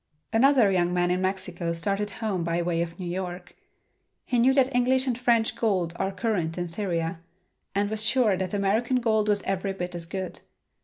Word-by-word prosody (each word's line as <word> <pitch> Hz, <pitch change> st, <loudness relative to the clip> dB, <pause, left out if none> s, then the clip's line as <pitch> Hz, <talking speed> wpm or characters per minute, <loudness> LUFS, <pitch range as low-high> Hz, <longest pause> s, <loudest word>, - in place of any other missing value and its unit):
Another 245 Hz, -3 st, +5 dB
young 175 Hz, -2 st, +2 dB
man 175 Hz, 0 st, +2 dB
in 180 Hz, +1 st, 0 dB
Mexico 185 Hz, -3 st, -2 dB
started 200 Hz, +5 st, -1 dB
home 200 Hz, -4 st, -2 dB
by 170 Hz, +1 st, 0 dB
way 170 Hz, -1 st, 0 dB
of 170 Hz, 0 st, -4 dB
New 180 Hz, -, -5 dB
York. 180 Hz, 0 st, -5 dB, 0.7 s
He 245 Hz, -, +1 dB
knew 250 Hz, +3 st, +5 dB
that 270 Hz, -1 st, +3 dB
English 255 Hz, +1 st, +2 dB
and 250 Hz, -3 st, 0 dB
French 235 Hz, -2 st, +2 dB
gold 185 Hz, -7 st, 0 dB
are 195 Hz, 0 st, -1 dB
current 190 Hz, -6 st, -1 dB
in 175 Hz, 0 st, -2 dB
Syria, 170 Hz, -2 st, -2 dB, 0.6 s
and 200 Hz, +1 st, +2 dB
was 215 Hz, +1 st, -1 dB
sure 225 Hz, -2 st, +3 dB
that 185 Hz, +1 st, -2 dB
American 220 Hz, +6 st, +1 dB
gold 220 Hz, -3 st, +1 dB
was 205 Hz, -1 st, +2 dB
every 195 Hz, 0 st, -2 dB
bit 180 Hz, -1 st, -5 dB
as 170 Hz, -1 st, -5 dB
good. 190 Hz, 0 st, -5 dB
195 Hz, 190 wpm, -26 LUFS, 175-225 Hz, 0.7 s, Another